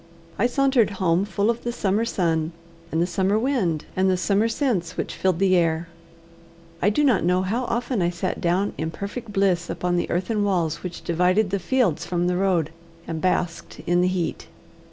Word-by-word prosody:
I 235 - +4
sauntered 265 -2 +3
home 180 0 +2
full 205 +2 +1
of 235 - -6
the 240 - -1
summer 210 0 0
sun, 165 -6 0 0.4
and 160 - 0
the 170 - +3
summer 190 +3 +1
wind, 220 - 0
and 190 0 +2
the 185 - +2
summer 200 +4 +2
scents 225 - -1
which - - -3
filled 185 -3 0
the 190 0 +3
air. 165 -1 +1 0.9
I 200 - +4
do 255 +8 +1
not 250 -10 +3
know 180 +2 +2
how 230 +7 -1
often 240 -2 -1
I 175 - +2
sat 175 +1 -3
down 180 +4 +1
in 160 +1 -1
perfect 205 +6 -6
bliss 190 -3 +1
upon 180 0 -1
the 175 - -1
earthen 205 +4 0
walls 175 -6 0
which 180 -1 -7
divided 180 +4 +2
the 200 - 0
fields 220 - +1
from 175 0 -1
the 180 0 +1
road, 180 -5 +1 0.4
and 160 -1 -4
basked 180 -2 -1
in 175 +1 +2
the 180 - +3
heat. 185 -2 -2
185 Hz, 195 wpm, -24 LUFS, 175-210 Hz, 0.9 s, I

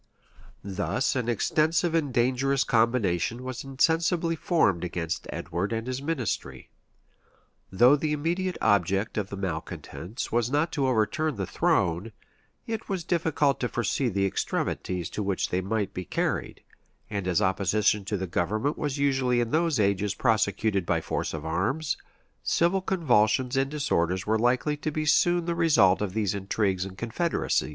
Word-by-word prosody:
[] - - -23 0.2
Thus 100 +7 -1
an 125 -2 -1
extensive 160 - +1
and 155 -5 +1
dangerous 130 +3 +2
combination 115 -2 +1
was 130 -1 -5
insensibly 165 +5 +1
formed 160 - +1
against 85 -2 -3
Edward 95 +5 -3
and 115 0 -2
his 130 +1 -3
ministry. 140 -7 -3 1.0
Though 120 +9 +6
the 150 +1 -1
immediate 170 +5 -1
object 100 -1 +2
of 105 -2 -2
the 100 - -6
malecontents 90 - -5
was 120 0 +1
not 150 +4 +1
to 140 -3 0
overturn 130 +6 +1
the 100 -2 -3
throne, 90 +5 0 0.5
it 225 -1 -5
was 190 -4 -2
difficult 155 -5 +1
to 125 - -1
foresee 120 +2 0
the 100 -2 0
extremities 90 -2 -2
to - - -3
which 100 -2 -1
they 90 - 0
might 100 0 -2
be 90 - -4
carried: - - -2 0.4
and 100 -3 -4
as 90 +1 +2
opposition 100 +1 +1
to 100 -2 -2
government 105 - -1
was 145 -2 -2
usually 130 -3 +2
in 120 -1 -1
those 160 -4 +1
ages 100 -1 +1
prosecuted 110 -3 +1
by 85 -1 0
force - - -3
of 80 -1 -6
arms, 100 - -1 0.5
civil 175 +3 +2
convulsions 130 - +2
and 135 0 +1
disorders 95 - 0
were 110 +1 +1
likely 125 +5 +1
to 150 - -3
be 155 +1 -2
soon 175 +3 +3
the 170 - 0
result 135 - +4
of 100 -3 -2
these 105 -4 0
intrigues 95 -1 -1
and 95 -1 -9
confederacies. 120 - -1
115 Hz, 155 wpm, -27 LUFS, 100-150 Hz, 1.0 s, Though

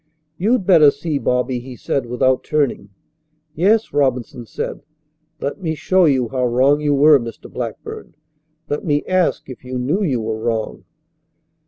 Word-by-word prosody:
"You'd 215 +2 +1
better 165 -6 +7
see, 150 0 -3
Bobby," 125 0 0
he 125 +1 -10
said 130 0 -2
without 130 +2 +1
turning. 140 -9 -1 0.6
"Yes," 205 +8 +2
Robinson 125 -4 -1
said. - - -5 0.6
"Let 145 +8 -4
me 160 -3 -2
show 185 +3 +2
you 130 -6 +2
how 125 0 0
wrong 135 +5 +3
you 145 -1 +1
were, 145 +1 +6
Mr. 115 -1 -8
Blackburn. - - -7 0.5
Let 145 - -3
me 145 -2 0
ask 185 -2 0
if 130 - -10
you 130 0 -5
knew 145 +11 -1
you 140 - 0
were 110 0 -3
wrong." 110 -1 -3
140 Hz, 155 wpm, -19 LUFS, 125-155 Hz, 0.6 s, better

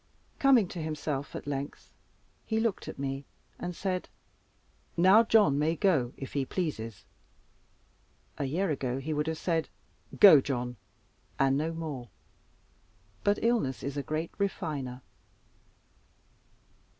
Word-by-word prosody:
Coming 260 -8 +5
to 175 - -5
himself 150 -2 -3
at - - -6
length, 140 0 -5 0.5
he 220 -1 -1
looked 225 -4 -1
at - - -7
me, 135 0 -3 0.4
and 175 0 -4
said, 185 -1 -2 0.9
"Now 190 +6 +7
John 210 -11 +4
may 160 +3 +2
go, 160 - +2
if 135 - -7
he 140 - +1
pleases." 115 - -4 1.3
A 140 - 0
year 165 +6 0
ago 130 -3 -2
he 145 +4 -3
would 150 +1 -1
have 160 0 -1
said, 165 -1 -1 0.5
"Go, 175 -9 +10
John," 125 -3 -3 0.6
and 135 0 +3
no 155 +3 0
more. 150 -8 -5 1.1
But 205 0 +3
illness 220 - +1
is 140 +1 -3
a 145 - -1
great 155 +4 -3
refiner. 145 -10 -3
155 Hz, 125 wpm, -29 LUFS, 135-185 Hz, 1.3 s, Go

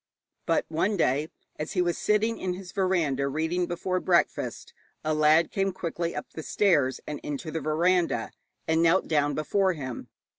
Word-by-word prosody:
But - - +2
one 190 +6 0
day, 150 0 +1 0.3
as 150 +5 -4
he 180 - +2
was 175 -1 0
sitting 215 +2 +1
in 180 -1 -2
his 185 -1 -9
veranda 170 -9 +1
reading 160 +5 -1
before 185 +1 -1
breakfast, 175 -1 0 0.3
a 155 - +1
lad 155 +2 +4
came 195 0 0
quickly 170 -1 -3
up - - -6
the 160 - -6
stairs 150 -8 +2
and 150 -2 -5
into 150 +2 -5
the 160 +1 -3
veranda, 170 +3 +1 0.4
and 160 0 +2
knelt 170 +3 +3
down 145 -2 +1
before 190 +5 +1
him. 130 -6 -6
165 Hz, 165 wpm, -27 LUFS, 155-185 Hz, 0.4 s, lad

